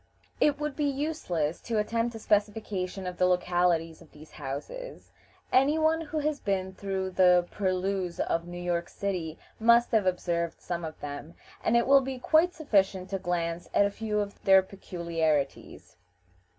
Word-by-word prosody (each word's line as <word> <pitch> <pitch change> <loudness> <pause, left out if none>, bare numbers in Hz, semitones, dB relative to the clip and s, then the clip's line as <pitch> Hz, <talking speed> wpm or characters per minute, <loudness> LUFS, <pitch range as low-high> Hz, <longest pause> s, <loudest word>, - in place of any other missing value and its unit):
It 295 -1 +3
would 300 -2 -3
be 295 - 0
useless 265 - -2
to 230 -2 -2
attempt 230 +2 0
a - - -4
specification 205 -3 -1
of 180 -1 -5
the 180 - +4
localities 175 -2 +1
of 165 - -17
these 155 +1 -15
houses; 150 - -7 0.4
any 275 +4 +4
one 320 +1 +2
who 315 -1 -5
has 300 -1 0
been 190 -2 -2
through 190 -1 -3
the 180 -1 +5
purlieus 185 -2 -1
of 165 +1 -1
New 175 0 -7
York 175 -1 -2
City 175 -5 -3 0.2
must 235 +2 +5
have 215 -5 +3
observed 170 -2 -1
some 175 -1 -4
of 160 -1 -6
them, 145 +3 -7 0.3
and 235 - +3
it 235 - +3
will 275 +1 +6
be 265 0 -4
quite 320 +7 +3
sufficient 195 - +1
to 195 - -1
glance 170 -1 -2
at 200 - +5
a 200 - 0
few 210 0 -2
of 200 -1 -5
their 190 -1 +6
peculiarities. 165 -6 -3
190 Hz, 165 wpm, -28 LUFS, 175-235 Hz, 0.4 s, will